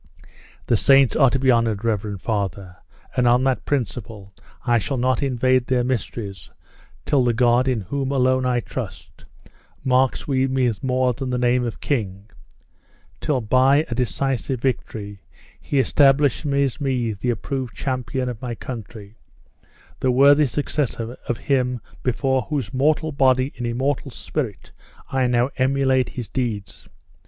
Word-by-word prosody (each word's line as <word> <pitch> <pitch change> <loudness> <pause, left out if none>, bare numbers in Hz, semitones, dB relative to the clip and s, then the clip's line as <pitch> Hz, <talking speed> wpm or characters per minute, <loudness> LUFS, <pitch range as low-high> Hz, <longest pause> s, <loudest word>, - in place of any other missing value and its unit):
"The 115 - +2
saints 135 +2 +5
are 135 -4 +5
to 135 - 0
be 130 0 +3
honored, 115 -2 +1
reverend 105 -3 -2
father, 100 -4 -3 0.4
and 125 -1 +2
on 120 +2 +4
that 130 -1 0
principle 115 -6 -4 0.3
I 120 -2 +3
shall 135 +6 -3
not 130 0 +1
invade 130 -2 +1
their 125 -1 +1
mysteries 115 -5 -4 0.6
till 140 -4 +2
the 120 -2 +1
God 120 +1 +3
in 125 -4 0
whom 135 +8 -3
alone 130 -1 +2
I 125 -1 +1
trust, - - -8 0.6
marks 130 0 +1
me 135 -2 +1
with 125 -5 0
more 130 -1 +1
than 130 +3 -5
the 125 - -1
name 125 0 +2
of 115 - -5
king; 105 -6 -3 0.9
till, 135 -4 0
by 130 +7 +3
a - - +1
decisive 130 +1 -1
victory, 105 -6 -3 0.4
he 145 - -3
establishes 140 0 +2
me 125 -5 0
the 105 +5 -3
approved 130 +1 -3
champion 130 -1 -2
of 120 -3 -5
my 120 -2 -4
country 110 -3 -9 0.8
the 130 - +1
worthy 140 +3 +5
successor 125 -4 -2
of 120 - 0
him 125 -3 0 0.2
before 130 +1 0
whose 135 -9 -3
mortal 155 +4 +1
body 130 -1 +2
and 120 - -4
immortal 135 +4 -1
spirit 110 - -5 0.4
I 130 -2 +2
now 120 +2 +1
emulate 130 -1 +2
his 120 -4 -6
deeds. 115 -6 -4
125 Hz, 145 wpm, -22 LUFS, 115-135 Hz, 0.9 s, saints